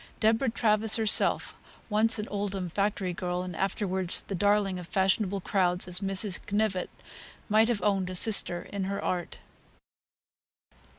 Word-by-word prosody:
Deborah 225 +4 +2
Travers 220 -1 +2
herself 220 -2 +2 0.3
(once 225 +2 +3
an 210 +1 -4
Oldham 200 -3 -3
factory 195 0 -1
girl, 180 +1 -3
and 180 -2 -7
afterwards 190 0 -1
the - - -7
darling 200 0 +1
of 175 - -9
fashionable 195 0 0
crowds 180 -1 0
as 180 0 +1
Mrs. 195 0 +1
Knyvett) 205 -3 -1 0.6
might 215 +1 +4
have 225 -6 -1
owned 195 -3 +1
a 185 - -6
sister 180 -3 +3
in 200 -2 -2
her 200 +1 -3
art. 175 -2 -3
195 Hz, 140 wpm, -28 LUFS, 185-210 Hz, 0.6 s, might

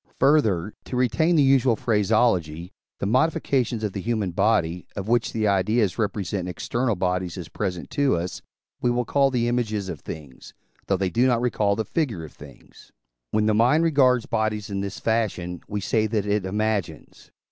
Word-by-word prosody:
Further, 110 - +2
to - - -5
retain 130 +8 +2
the 150 - +5
usual 135 -3 +4
phraseology, 100 -7 +1 0.3
the - - -3
modifications 130 -2 +1
of 105 -3 -2
the 100 - -4
human 110 -3 -1
body, 90 -3 +1
of 100 0 -5
which 120 0 +1
the 110 -2 0
ideas 100 +1 +1
represent 100 -3 -2
external 120 +6 -1
bodies 90 -1 -2
as 90 -3 -7
present 90 -4 -4
to 140 -2 +2
us, 85 +1 -4 0.4
we 125 - +2
will 120 0 0
call 140 +3 +3
the 120 -3 0
images 110 -5 -1
of 85 -5 -5
things, 70 -5 -10 0.3
though 100 - +2
they 95 -1 -1
do 120 +7 +3
not 120 -2 +2
recall 105 -4 +1
the 110 - -2
figure 115 - -2
of 75 - -13
things. 70 -4 -16 0.4
When 110 - +1
the 110 - +3
mind 125 +9 +4
regards 130 -7 +3
bodies 110 -2 -2
in 100 0 -2
this 100 -1 -5
fashion, 95 -6 -1
we 105 - -3
say 110 +2 +1
that 105 -2 -1
it 105 -2 0
imagines. 105 -5 -3
110 Hz, 180 wpm, -24 LUFS, 95-120 Hz, 0.4 s, the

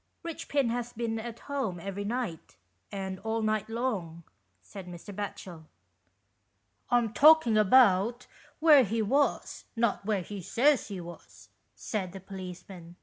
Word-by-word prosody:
" - - -28
Eichpin 285 -6 -1
has 240 0 -3
been 225 -1 -3
at 230 0 -8
home 265 -11 -3
every 195 +3 -5
night, 220 -6 -4 0.4
and 190 -1 -5
all 220 +1 -2
night 215 -1 -1
long," 205 -9 -3 0.4
said 180 - -11
Mr. 180 +3 -9
Batchel. 185 -5 -7 0.6
" 100 0 -46
I'm 235 -3 +2
talking 290 -1 +6
about 215 +1 +4 0.3
where 305 -4 +7
he 225 +1 -1
was, 275 +7 0
not 230 -3 0
where 200 -3 -1
he 200 +2 -7
says 265 - +2
he 200 -3 -6
was," 175 0 -12 0.3
said 190 -5 -4
the 195 - -7
policeman. 180 -2 -10
210 Hz, 145 wpm, -29 LUFS, 185-240 Hz, 0.6 s, where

